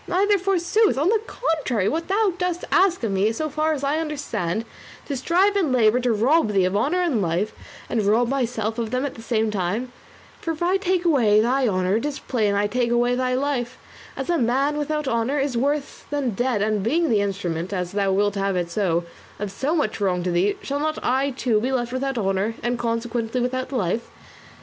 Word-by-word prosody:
Neither 400 +2 +2
forsooth; 390 +2 +2
on 300 +6 +2
the 440 0 +2
contrary, 275 - -1
thou 380 +5 +1
dost 360 -1 -1
ask 370 -6 +3
of 225 - 0
me, 195 +3 +2
so 310 +7 -3
far 310 +2 0
as 285 -2 -4
I 285 +3 +1
understand, 230 - -3 0.4
to 280 - -3
strive 360 +10 +2
and 360 -9 +1
labour 240 -1 +4
to 245 -1 +1
rob 230 +2 +2
thee 190 -2 +3
of 185 +2 -1
honour 290 - +1
and 280 -12 +1
life, 180 +4 -1 0.3
and 230 - 0
to 200 - +1
rob 235 +3 +3
myself 235 -4 -1
of 230 -2 -2
them 255 +3 -1
at 280 - -4
the 225 - -11
same 225 -2 0
time; 210 +6 -2 0.5
for 330 - -2
if 315 - -5
I 365 +2 +3
take 370 -2 0
away 235 -10 +4
thy 250 +4 +2
honour 185 0 +1
it 230 - -3
is 290 - -4
plain 215 -5 0
I 205 +1 +2
take 235 +3 0
away 240 +1 +2
thy 255 0 0
life, 260 -2 -2 0.4
as - - -2
a 340 - +2
man 270 +5 +1
without 300 0 -2
honour 235 +3 0
is 275 -2 -1
worse 285 +4 -1
than 285 -4 -1
dead; 230 0 0
and 215 -1 0
being 315 - +1
the 210 -2 +3
instrument, 185 -3 -3
as 180 -2 -2
thou 200 -1 +1
wilt 205 +1 +2
have 195 -1 -1
it 175 -1 -2
so, 175 -3 +1 0.3
of 205 -1 -4
so 280 - -1
much 225 -9 -1
wrong 180 -3 +1
to 180 - -1
thee, 180 +4 +2
shall 280 +1 -2
not 310 +1 -1
I, 265 +3 +1
too, 245 -5 0
be 255 +3 -1
left 245 -2 -1
without 270 0 -2
honour, 195 +1 0
and 240 0 -1
consequently 230 0 -2
without 255 +1 -2
life? 225 -2 -1
245 Hz, 215 wpm, -23 LUFS, 210-295 Hz, 0.5 s, labour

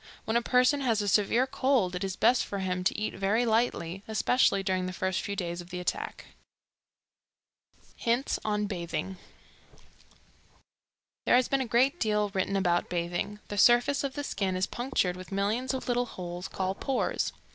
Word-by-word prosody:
When 220 - -1
a 235 - +4
person 250 +4 +3
has 230 -5 +1
a - - -3
severe 215 +5 +3
cold 260 -8 +1
it 180 +2 -3
is 190 -1 -3
best 250 +5 +3
for 200 - -5
him 185 -1 -2
to - - +1
eat 215 - -2
very 210 +5 +1
lightly, 220 -6 0
especially 220 -2 +2
during 185 -1 0
the 185 - -5
first 185 0 -1
few 200 - -4
days 175 -2 -3
of 175 - -13
the 180 0 -5
attack. 180 - -4 1.7
Hints 240 +3 0
on 210 -1 0
Bathing. 180 +1 -4 2.1
There - - +6
has 250 -1 +4
been 275 -1 +1
a 260 - -2
great 260 +8 +2
deal 210 -2 +1
written 195 0 -1
about 175 -3 +1
bathing. 175 +4 -3
The 205 - -2
surface 245 +6 +5
of 275 -1 -2
the 290 - -3
skin 195 -8 -2
is 185 0 +1
punctured 240 -8 -1
with 185 +1 -10
millions 215 +6 0
of 265 -1 -4
little 245 0 +1
holes 180 -2 -6
called 190 0 -3
pores. 270 -2 -1
205 Hz, 175 wpm, -29 LUFS, 185-245 Hz, 2.1 s, There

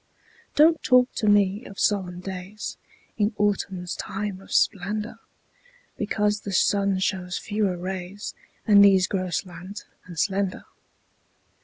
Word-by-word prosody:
Don't 320 +2 +5
talk 250 0 +4
to 215 - 0
me 205 +1 +3
of 195 - -10
solemn 180 -4 0
days 190 +2 -6 0.4
In 210 +1 +1
autumn's 195 -3 -1
time 195 -1 -4
of - - -15
splendor, 210 +3 0 0.8
Because 210 0 0
the 200 - -6
sun 195 +1 +2
shows 185 -1 -1
fewer 205 -4 -1
rays, 185 +2 -5 0.3
And 205 -2 +7
these 190 -2 +6
grow 185 -2 -2
slant 180 +3 -5 0.2
and 175 -2 -10
slender. 195 +1 -1
195 Hz, 125 wpm, -25 LUFS, 185-210 Hz, 0.8 s, And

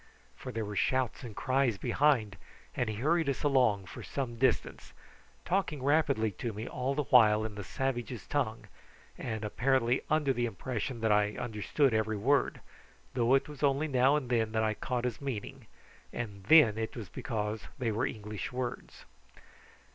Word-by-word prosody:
For 125 - -7
there 115 -2 -3
were 105 0 -6
shouts 130 +4 0
and 115 -5 -8
cries 130 -4 +1
behind, 120 -6 +2 0.4
and 120 - -1
he 110 - -3
hurried 155 +7 +1
us 140 - -2
along 125 -9 +3
for - - -9
some 130 -4 -4
distance, 130 -2 0 0.5
talking 175 -7 -1
rapidly 140 -7 +2
to 115 -2 -2
me 110 +3 -6
all 130 +2 -2
the 150 - 0
while 110 -4 +5
in 110 - -5
the 105 0 -6
savages' 125 +1 -3
tongue, 125 -6 -2 0.5
and 110 -2 -4
apparently 125 +2 +1
under 150 -3 +2
the 120 -1 0
impression 115 +2 -4
that 110 -1 +2
I 105 0 +2
understood 120 +4 0
every 110 -1 0
word, 140 +8 +1 0.5
though 125 +1 +3
it 135 - +1
was 150 -3 -10
only 140 +1 +2
now 135 0 +3
and 145 -4 -1
then 110 -2 +1
that 110 0 +1
I 110 -1 +1
caught 125 +2 -3
his 125 0 -3
meaning, 130 -7 -5 0.4
and 100 -5 -6
then 115 -5 +6
it 110 - -3
was 110 -5 -6
because 105 -1 -4
they 120 -4 -1
were 110 +5 0
English 105 0 -6
words. 125 -1 -5
120 Hz, 170 wpm, -31 LUFS, 110-135 Hz, 0.5 s, then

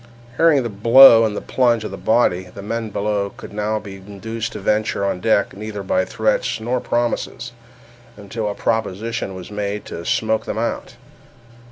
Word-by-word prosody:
Hearing 160 -5 +4
the 120 - -3
blow 115 +3 +7
and 105 -2 -2
the - - -3
plunge 120 -3 +1
of 105 - -5
the - - -5
body, 95 -2 +1
the 100 - -8
men 115 +1 -3
below 100 0 -1
could - - -10
now 105 +1 -1
be 100 -2 -8
induced 105 +4 -6
to - - -6
venture 105 0 0
on 100 - -1
deck 105 -2 +1
neither 105 0 -6
by 95 -1 +1
threats 110 +2 -1
nor 120 +3 -1
promises, 120 0 -2 0.7
until 105 +1 -4
a 100 - -4
proposition 110 -1 -2
was 95 +1 -9
made 105 0 -4
to 85 - -7
smoke 110 +5 0
them - - -4
out. 115 +1 -3
105 Hz, 175 wpm, -20 LUFS, 100-115 Hz, 0.7 s, blow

